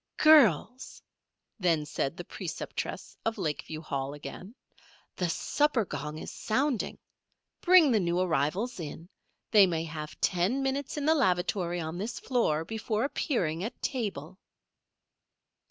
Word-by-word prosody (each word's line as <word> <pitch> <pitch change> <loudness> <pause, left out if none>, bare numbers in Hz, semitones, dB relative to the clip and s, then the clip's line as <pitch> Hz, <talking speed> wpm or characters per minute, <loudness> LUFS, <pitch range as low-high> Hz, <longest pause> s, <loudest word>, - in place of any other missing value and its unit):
"Girls!" 255 - +4 0.6
then 165 -5 +2
said 145 +1 -2
the 175 - -5
preceptress 175 -1 -5
of 225 0 -1
Lakeview 155 0 -3
Hall 140 -2 -3
again. 185 - -9 0.6
"The 180 -2 -1
supper 280 - +1
gong 150 -3 -5
is - - -7
sounding. 260 +1 -1 0.6
Bring 350 -6 +6
the 220 - +4
new 175 -1 0
arrivals 185 - 0
in. 165 +2 -7 0.4
They 205 -4 +7
may 165 -2 -1
have 155 -1 -7
ten 190 +10 +1
minutes 270 +2 -2
in 290 - -2
the 315 - +5
lavatory 180 - +1
on 160 +1 -4
this 220 +5 -4
floor 165 - 0
before 220 +2 -2
appearing 185 - -1
at 225 - -5
table." 195 - -3
185 Hz, 130 wpm, -29 LUFS, 160-245 Hz, 0.6 s, They